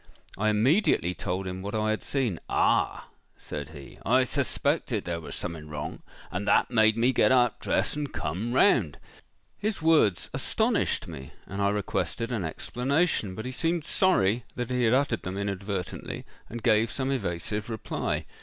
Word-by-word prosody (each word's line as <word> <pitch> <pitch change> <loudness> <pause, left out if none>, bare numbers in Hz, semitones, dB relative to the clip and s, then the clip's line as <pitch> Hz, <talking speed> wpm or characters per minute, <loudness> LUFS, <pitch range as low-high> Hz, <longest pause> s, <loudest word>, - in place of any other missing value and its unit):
I 110 +2 +1
immediately 110 - +3
told 95 +1 -3
him 95 0 -5
what 100 +3 -4
I 110 0 +1
had 110 - -1
seen.—'Ah!' 125 -11 0 0.3
said 75 0 -6
he, 70 -3 -12
'I 130 +2 +4
suspected 140 -3 0
there 85 -1 -3
was - - -6
something 80 -3 -5
wrong, 75 +1 -5 0.3
and 100 +3 -3
that 100 - +3
made 110 -2 +4
me 120 +3 +3
get - - +4
up, 125 -2 +3
dress, - - 0
and 145 -1 -3
come 90 +10 -3
round.'—His 130 - 0
words 155 - +3
astonished - - 0
me; 70 -5 -9
and 100 +1 -5
I 100 - +3
requested 105 +3 -2
an 110 -6 -1
explanation; 125 - 0
but 110 - -6
he 130 - -3
seemed 165 +4 -1
sorry 120 - +2
that 125 0 -3
he 125 -1 +2
had 115 +2 +4
uttered 135 -4 +1
them 95 +1 -5
inadvertently, 100 -2 -4 0.2
and 120 0 -7
gave 110 -1 +4
some 135 +1 -2
evasive 105 -2 -2
reply. 110 -2 -2
110 Hz, 160 wpm, -27 LUFS, 95-130 Hz, 0.3 s, I